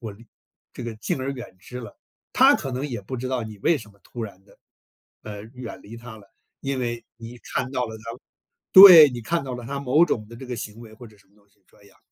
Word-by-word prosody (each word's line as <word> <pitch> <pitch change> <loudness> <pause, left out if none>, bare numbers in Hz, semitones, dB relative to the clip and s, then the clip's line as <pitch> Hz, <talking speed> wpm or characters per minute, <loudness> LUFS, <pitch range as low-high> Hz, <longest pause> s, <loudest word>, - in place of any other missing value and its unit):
“我 110 -4 -7
离 115 +4 -18 0.5
这 125 - -8
个 115 -1 -6
敬 110 - -3
而 135 +1 -3
远 125 -7 -10
之 125 +6 -10
了。” 115 -4 -12 0.3
他 - - +6
可 135 - -6
能 130 +3 -3
也 120 -4 -5
不 130 +6 -6
知 130 +2 -5
道 130 -2 -2
你 110 -1 -10
为 165 +11 +2
什 110 -4 -13
么 100 - -25
突 120 - -8
然 100 -3 -9
地， - - -23 0.7
呃， 105 -1 -8
远 125 -2 -9
离 115 +3 -11
他 115 -1 -11
了。 100 - -18 0.3
因 135 -1 -3
为 120 -1 -4
你 115 +1 -11
看 125 +2 -4
到 125 -2 -1
了 110 0 -8
他 110 - -17 0.7
对， 180 -7 +11
你 120 - -6
看 170 +8 -1
到 130 - -5
了 120 -1 -8
他 140 +1 -5
某 140 +5 +3
种 110 -10 -3
的 115 - -12
这 130 - -10
个 125 - -5
行 105 0 -8
为 110 -2 -13
或 120 +2 -13
者 105 -2 -19
什 100 - -27
么 100 - -32
东 100 -1 -29
西 100 - -36
这 - - -25
样， 100 - -23
120 Hz, 275 characters per minute, -23 LUFS, 110-130 Hz, 0.7 s, 对